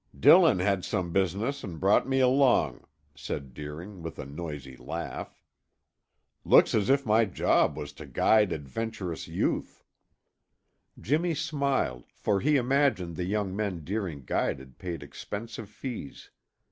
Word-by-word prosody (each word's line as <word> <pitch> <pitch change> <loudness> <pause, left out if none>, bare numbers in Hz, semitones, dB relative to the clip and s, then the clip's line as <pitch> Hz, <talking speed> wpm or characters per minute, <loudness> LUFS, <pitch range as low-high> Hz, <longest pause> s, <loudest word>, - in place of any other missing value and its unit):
"Dillon 90 - +7
had 95 0 +1
some 90 -5 -2
business 100 +10 0
and 85 -6 -6
brought 100 +6 +3
me 135 0 +2
along," 125 - +3 0.3
said 70 -1 -6
Deering 80 +8 -8
with 80 -1 -7
a - - -6
noisy 70 -2 -7
laugh. - - -6 1.0
"Looks - - +6
as 105 0 +1
if 140 0 +3
my 110 +1 +4
job 95 - +2
was 75 0 -6
to 75 0 -10
guide 105 - +3
adventurous 85 - -4
youth." - - -2 1.2
Jimmy 160 +6 +1
smiled, 140 - -1
for 100 -2 0
he 150 +7 +2
imagined 130 - +2
the 90 - -3
young 100 -1 -1
men 100 -6 -2
Deering 90 -6 -3
guided 65 0 -2
paid 85 -2 -5
expensive 110 0 -7
fees. 110 - -8
95 Hz, 135 wpm, -28 LUFS, 80-115 Hz, 1.2 s, Dillon